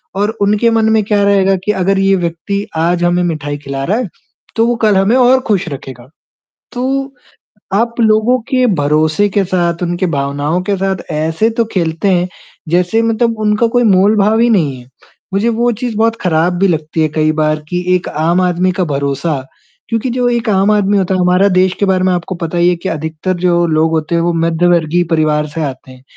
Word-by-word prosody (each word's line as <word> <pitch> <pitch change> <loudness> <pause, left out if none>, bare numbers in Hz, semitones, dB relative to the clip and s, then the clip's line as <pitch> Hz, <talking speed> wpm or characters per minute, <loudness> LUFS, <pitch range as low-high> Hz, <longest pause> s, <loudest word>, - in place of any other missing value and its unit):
और 205 +2 0
उनके 210 +3 +2
मन 225 -1 +2
में 220 -1 +2
क्या 205 0 +1
रहेगा 195 -1 +3
की 210 - +2
अगर 195 0 0
ये 195 0 +3
व्यक्ति 180 +3 -3
आज 170 +2 0
हमें 175 +1 +2
मिठाई 155 -4 -3
खिला 140 -1 -5
रहा 195 +10 0
है, 250 -2 -2 0.5
तो 225 - +2
वो 240 - +1
कल 210 -2 +3
हमें 195 +5 +2
और 255 0 +4
खुश 200 -6 0
रखेगा। 130 -3 -9 0.6
तो 245 - -4 0.9
आप 230 +3 0
लोगों 220 +3 +3
के 255 -1 +2
भरोसे 155 +6 +1
के 200 0 +1
साथ 175 -2 -1
उनकी 175 +1 -1
भावनाओं 145 +5 -1
के 200 +1 -1
साथ 195 0 -1 0.2
ऐसे 160 +7 0
तो 230 - +3
खेलते 165 -1 -1
हैं 180 -1 +1 0.4
जैसे 180 +6 +1
मतलब 230 0 0
उनका 215 +2 +1
कोई 245 - +4
मोल 200 0 +4
भाव 215 +2 +2
ही 240 +1 +3
नहीं 160 - +1
है। 125 - -14 0.5
मुझे 205 +4 +1
वो 235 +1 +1
चीज़ 240 -3 -3
बहुत 225 +1 +2
खराब 170 0 +1
भी 195 - +3
लगती 160 -2 -2
है 155 - +3
कई 155 0 +2
बार 155 0 +1
कि 180 0 -2
एक 180 - -3
आम 165 +4 0
आदमी 180 0 +1
का - - +3
भरोसा 140 +3 -1 0.5
क्योंकि 230 +2 -1
जो 245 0 0
एक 235 -1 -1
आम 195 0 +2
आदमी 205 -1 +2
होता 190 -1 0
है - - -1
हमारा 180 +2 +3
देश 185 0 +3
के 200 - +2
बारे 190 -1 +1
में 185 0 +2
आपको 175 +1 -3
पता 170 0 -4
ही 175 +1 +3
है 180 - +1
कि 175 +3 -5
अधिकतर 160 +3 -3
जो 175 -1 +2
लोग 160 0 +1
होते 160 +1 -1
हैं 170 - +1
वो 170 +1 0
मध्यवर्गीय 170 0 +1
परिवार 155 -1 +1
से 165 - -2
आते 130 -2 -6
हैं 130 0 -16
180 Hz, 210 wpm, -14 LUFS, 160-210 Hz, 0.9 s, और